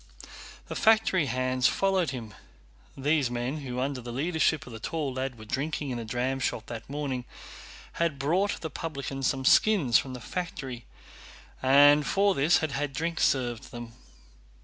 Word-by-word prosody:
The - - -5
factory 220 -8 +3
hands 130 0 +1
followed 190 -5 +1
him. 115 -5 -6 0.6
These 145 -1 +1
men, 120 +4 -2
who 125 -4 -5
under 135 0 -2
the 120 0 -7
leadership 155 +3 0
of 125 - -10
the 115 - -7
tall 145 +2 -3
lad 130 -1 -3
were 110 - -11
drinking 145 +3 -2
in 120 - -3
the 115 - -5
dramshop 125 0 -2
that 115 +1 -8
morning, 140 -3 -3 0.7
had 165 -4 -1
brought 175 +9 0
the 160 - -5
publican 140 -3 -5
some 135 0 0
skins 175 - +5
from 130 -2 -6
the - - -7
factory 130 -5 -5 0.7
and 145 +3 +6
for 200 0 +3
this 150 +3 +4
had 155 - -5
had 140 0 -2
drink 165 +3 -2
served 120 -4 0
them. 120 -1 -8
135 Hz, 160 wpm, -28 LUFS, 125-160 Hz, 0.7 s, and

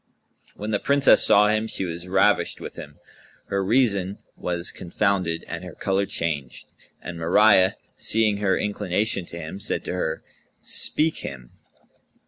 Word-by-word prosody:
When 105 +2 -5
the 105 - +1
Princess 140 0 +5
saw 105 +1 +5
him, 110 +1 +1
she 95 - -3
was 85 +1 -6
ravished 95 +1 +2
with - - -8
him, - - -10 0.5
her 100 0 0
reason 100 -3 +1 0.2
was 85 -1 -3
confounded 90 -2 -1
and 85 +2 -6
her 90 -2 -9
colour 95 0 0
changed; 75 -8 -3 0.4
and 85 -1 -7
Mariyah, 95 +3 +5 0.2
seeing 110 -2 +1
her 100 -2 +1
inclination 100 -2 -1
to 85 - -9
him, 85 +3 -7
said - - -2
to - - -3
her, 80 -3 -2 0.4
"Speak 155 +1 0
him." 65 -3 -8
95 Hz, 145 wpm, -24 LUFS, 85-105 Hz, 0.5 s, Princess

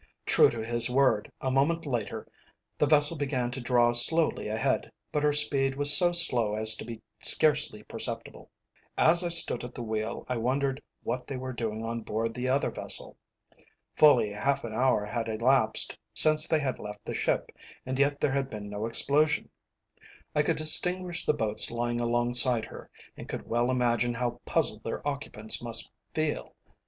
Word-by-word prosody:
True - - +5
to 115 -2 -5
his 120 +1 +2
word, 130 -4 +1
a 130 - -1
moment 155 +6 +1
later 120 -7 -4 0.5
the 150 - +3
vessel 150 +2 +4
began 135 -4 -2
to 130 +1 -6
draw 120 -1 +2
slowly 155 +7 +4
ahead, 110 +1 -1 0.2
but 150 - -1
her 150 0 +2
speed 140 -2 0
was 145 +1 +7
so 175 -2 +5
slow 120 -11 +3
as 110 0 +4
to - - -7
be 115 -1 -9 0.2
scarcely 150 -8 +2
perceptible. - - -6 0.5
As 170 +3 +4
I 175 - -1
stood 165 -8 +1
at 125 0 -9
the 120 - -6
wheel 110 0 -4
I 125 - -2
wondered 135 +3 -1 0.2
what 125 0 -4
they 135 - -5
were 130 0 -6
doing 110 -2 -4
on 115 0 -4
board 115 +1 -3
the 125 +2 -3
other 135 +2 0
vessel. - - -3 0.8
Fully 145 -8 +4
half 135 +7 -1
an 115 -2 -6
hour 125 -3 +1
had 115 +2 -4
elapsed 115 +1 +2 0.2
since 155 0 +5
they 160 -2 +1
had 130 -3 -3
left 105 0 -9
the - - -5
ship, - - -1 0.3
and 130 +1 -4
yet 145 0 +1
there 140 - 0
had 135 -1 -1
been 105 -3 -8
no 105 +2 -4
explosion. 150 +6 +2 0.8
I 150 - +3
could 150 - -1
distinguish 180 +3 0
the 150 - +2
boats 110 -6 -2
lying 120 0 -2
alongside 120 0 +1
her, - - -12 0.3
and - - -11
could - - -6
well 120 +1 0
imagine 120 -1 0
how 120 0 -3
puzzled - - 0
their - - -5
occupants 135 -6 -3
must 115 -1 -3 0.2
feel. 155 -1 -3
125 Hz, 175 wpm, -28 LUFS, 115-145 Hz, 0.8 s, was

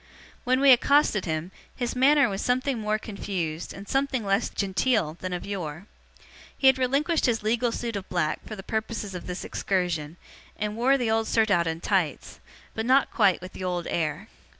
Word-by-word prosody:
When 255 +1 +3
we 275 -1 +7
accosted 255 -4 +4
him, 160 +2 -3 0.2
his 245 -1 -3
manner 280 +3 +5
was 195 -1 -3
something 255 0 0
more 215 0 0
confused, 180 -6 -4
and 200 +1 -10
something 270 -4 0
less 195 +3 +1
genteel, 195 -4 0
than 185 - -4
of 180 - -4
yore. 175 -3 -5 0.7
He - - -2
had 265 0 +6
relinquished 280 +6 +1
his 225 -3 0
legal 235 +2 +1
suit 230 -1 -4
of 195 -1 -5
black 155 -4 -1
for 215 - -6
the 190 - -9
purposes 220 -1 -3
of 180 - -7
this 180 0 -5
excursion, 175 -4 -2 0.4
and 210 +1 -3
wore 260 +4 +3
the 240 -4 0
old 225 0 +1
surtout 200 -7 +2
and 165 +1 -3
tights, - - -1 0.3
but 220 +1 -3
not 265 +2 +4
quite 185 -2 +3
with 185 +1 -9
the - - -7
old 180 -2 -2
air. 165 +4 -2
210 Hz, 185 wpm, -26 LUFS, 180-250 Hz, 0.7 s, we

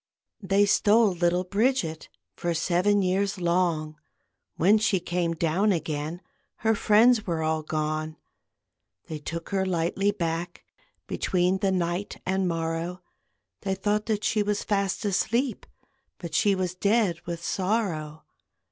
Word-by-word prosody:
They 195 +1 +3
stole 210 +1 +4
little 175 0 +1
Bridget 200 -4 0 0.3
For 170 -1 -2
seven 185 +4 +2
years 195 +2 0
long; 170 -3 0 0.6
When 200 +6 +4
she 205 -3 +2
came 175 -1 -1
down 170 +6 +1
again 160 0 -3 0.4
Her 220 - +5
friends 220 +2 +4
were 165 -2 -1
all 160 0 0
gone. 155 0 -3 0.9
They 155 -1 -6
took 165 +3 -6
her 195 -1 0
lightly 185 +2 0
back, 170 -3 -3 0.4
Between 180 +1 0
the 195 0 +1
night 180 +1 -2
and 190 0 0
morrow; 165 +1 -3 0.6
They 195 -1 -1
thought 210 +2 -1
that 215 -2 -1
she 215 - +1
was 205 0 -1
fast 200 0 -1
asleep, 230 +6 0 0.5
But 170 -3 -8
she 200 +4 +3
was 185 -2 -2
dead 200 -2 +1
with 170 0 -5
sorrow. 180 -7 -2
180 Hz, 130 wpm, -26 LUFS, 165-205 Hz, 0.9 s, Her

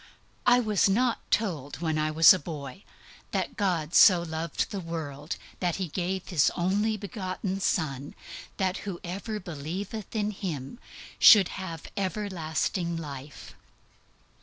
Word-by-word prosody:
I 245 0 +7
was 215 -4 +2
not 235 +4 +2
told 165 - -1
when 160 -2 -1
I 155 0 +1
was 160 +3 +8
a 185 - -1
boy 145 +1 -7 0.5
that - - -2
"God 175 -6 -1
so 180 -3 +7
loved 160 -1 -3
the 200 - -3
world 160 -3 -5 0.2
that 175 -2 0
He 185 -3 -3
gave 185 +3 -3
His 160 -8 +3
only 205 +5 +1
begotten 195 -2 -4
Son, 145 -7 -1 0.4
that 190 -1 0
whosoever 195 +3 -5
believeth 185 +6 -6
in 210 -1 0
Him 180 - -5 0.4
should 200 -4 +8
have 170 -4 -6
everlasting 180 -4 -2
life." 145 -2 -8
180 Hz, 130 wpm, -28 LUFS, 160-200 Hz, 0.5 s, was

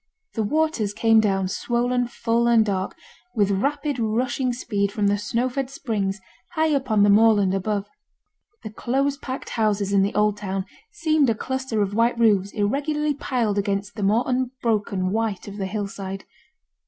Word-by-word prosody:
The 225 - -1
waters 225 -4 0
came 225 -1 +4
down, 195 -3 +1
swollen 245 +4 0
full 235 0 0
and 230 -2 +5
dark, 190 -2 -2 0.4
with 205 -3 +2
rapid 280 +6 -1
rushing 245 +3 0
speed 205 -5 -1
from 210 -1 -1
the 200 0 +3
snow 230 +4 0
fed 260 +1 -3
springs 210 -7 -2 0.3
high 315 -2 +2
up 270 -2 -1
on 215 -2 +4
the 205 - +5
moorland 205 -3 +5
above. 200 +1 -1 0.8
The 215 - -6
close 275 +5 0
packed 265 -2 -6
houses 205 -3 0
in 200 - +5
the 200 +1 0
old 210 0 +2
town 195 -2 -3 0.3
seemed 315 - +2
a 225 - +2
cluster 260 -3 -2
of 200 0 -3
white 230 +2 +2
roofs 205 -4 +3
irregularly 290 +8 0
piled 235 -7 -1
against 200 0 -2
the 215 - -5
more 210 +5 +3
unbroken 230 -7 -1
white 220 -2 -2
of 200 0 -8
the 195 -2 -2
hill 205 +1 -2
side. 195 -1 -7
220 Hz, 170 wpm, -23 LUFS, 200-255 Hz, 0.8 s, and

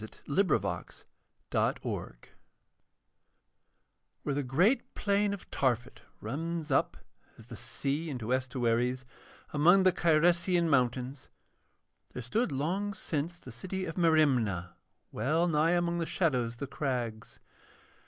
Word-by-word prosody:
The 110 - -7 0.2
Sword 180 +6 +1
of - - +4 0.9
Welleran - - -1 2.1
Where 145 - -1
the 145 - 0
great 170 - +1
plain 205 0 +1
of 200 - -7
Tarphet 125 -2 -1 0.2
runs 165 +1 -4
up, 135 - +2 0.4
as - - -14
the - - -9
sea 145 +4 -3
in 135 - -3
estuaries, 125 +1 0 0.5
among 175 +6 +5
the 185 -1 +5
Cyresian 170 +2 +3
mountains, 130 0 0 0.8
there 125 - -5
stood 215 - 0
long 185 +9 -1
since 165 0 -3
the 130 -7 -11
city 185 +10 -4
of 165 - -4
Merimna 130 - +2 0.4
well 155 +10 +1
nigh 160 +1 +3
among 170 -1 +1
the 165 - -2
shadows 125 -10 0
of 120 - -19
the - - -1
crags. 120 -6 -4
150 Hz, 125 wpm, -30 LUFS, 125-175 Hz, 2.1 s, among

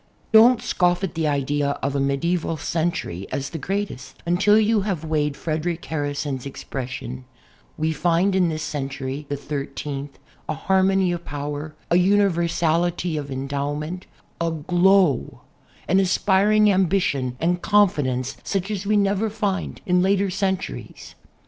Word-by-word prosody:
Don't 235 +2 +6
scoff 180 +1 +1
at 190 - -2
the 160 -2 0
idea 145 0 0
of 140 0 -1
a - - +1
medieval 160 +5 0
century 155 - -2
as 135 0 -3
the 165 - -5
greatest 185 -7 -4
until 185 +5 +4
you 215 0 +3
have 190 -6 -3
weighed 150 -2 0
Frederic 165 +2 -3
Harrison's 145 -3 -3
ex 140 - -9
pression: 125 -1 -5 0.5
"We 155 +1 0
find 170 +5 +2
in 180 -3 +3
this 155 -1 -3
century 140 -1 -4
(the 145 - -1
thirteenth) 140 0 -5 0.3
a 155 - -1
harmony 190 +2 +2
of 175 -1 -4
power, 145 +1 -5 0.2
a 170 - +5
universality 175 -3 +2
of 145 -2 -4
endowment, 145 +6 -3 0.3
a 170 - +1
glow, 175 - +2 0.5
an 190 - +4
aspiring 205 +3 +3
ambition 175 -9 +1
and 175 +2 0
confidence 145 - +2
such 195 +1 -2
as 200 -1 -3
we 210 0 +3
never 200 +2 +1
find 205 -3 -3
in 180 0 +3
later 195 +1 +2
centuries." 190 0 -3
165 Hz, 140 wpm, -23 LUFS, 145-190 Hz, 0.5 s, Don't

